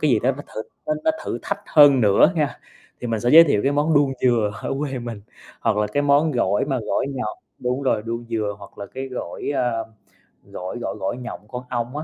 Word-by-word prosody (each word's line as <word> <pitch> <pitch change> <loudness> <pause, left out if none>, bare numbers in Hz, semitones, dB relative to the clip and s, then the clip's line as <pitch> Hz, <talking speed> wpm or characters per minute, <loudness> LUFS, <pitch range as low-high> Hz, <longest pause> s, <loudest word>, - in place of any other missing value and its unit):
cái 150 - +2
gì 120 - +4
đó 130 - +3
nó 145 +2 -8
thử 110 - -3 0.2
nó 305 - +1
nó 320 - +5
thử - - -3
thách - - -3
hơn 145 -3 +7
nữa 105 - +5
nha, 150 -4 -1 0.4
thì 125 - -4
mình 115 -2 -1
sẽ 120 - 0
giới 165 +3 +10
thiệu 140 -10 +2
cái 140 - +2
món 150 +2 +2
đuông 145 -2 +4
dừa 115 -4 +2
ở - - -2
quê 140 -3 -3
mình, 120 -4 -7 0.4
hoặc - - +1
là 105 0 +2
cái 145 +8 -1
món 145 +2 +4
gỏi 105 -5 +1
mà 135 -2 -1
gỏi 110 - -1
nhọt 125 -5 -3 0.2
đúng 125 +1 -2
rồi, 130 -5 +1
đuông 115 +1 -4
dừa, 110 -3 -1
hoặc 100 0 -14
là 100 - -6
cái 135 +4 -6
gỏi, 125 0 -4
a, 125 -2 +1 0.7
gỏi 95 +5 -7
gỏi - - -4
gỏi 95 - -2
nhộng 120 -4 -8
con 125 +3 -6
ong 120 +2 -3
á, 150 - -3
125 Hz, 240 wpm, -22 LUFS, 110-140 Hz, 0.7 s, giới